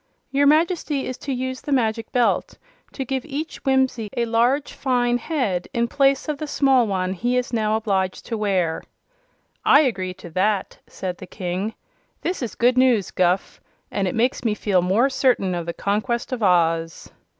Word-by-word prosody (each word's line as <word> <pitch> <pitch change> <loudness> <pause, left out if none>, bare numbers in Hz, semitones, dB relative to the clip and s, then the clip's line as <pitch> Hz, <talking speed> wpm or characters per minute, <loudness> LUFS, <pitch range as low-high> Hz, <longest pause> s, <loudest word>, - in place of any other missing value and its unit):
"Your 280 +1 +3
Majesty 310 -2 +2
is 255 - -4
to 280 - -5
use 260 0 -3
the 290 - -6
Magic 225 -4 0
Belt 245 -2 +1 0.4
to 270 - -4
give 265 0 -2
each 310 +1 -6
Whimsie 265 -5 +1
a 235 - +2
large, 240 +5 +1
fine 245 -2 +1
head, 230 - -1
in 235 0 +1
place 275 +2 +2
of 300 -2 -3
the 305 - -4
small 270 -4 +3
one 185 -2 -1
he 240 +6 0
is 250 -1 -2
now 215 -1 +1
obliged 195 -4 -1
to 230 - -3
wear." 190 -6 0 0.8
"I 285 - +6
agree 190 -10 -1
to 175 - -11
that," 195 +3 0
said 180 -2 -5
the 185 - -9
King. 185 +3 -4 0.5
"This 360 -2 -2
is 240 - -4
good 245 +2 +3
news, 245 -7 +3
Guph, 180 +1 0 0.3
and 195 -2 -1
it 180 - -2
makes 245 +3 +1
me 220 -3 +1
feel 195 -4 +1
more 195 +9 +3
certain 255 -8 +1
of 170 -1 -4
the - - -1
conquest 220 +7 -1
of 250 -2 -3
Oz." 165 -4 +1
235 Hz, 180 wpm, -22 LUFS, 190-265 Hz, 0.8 s, I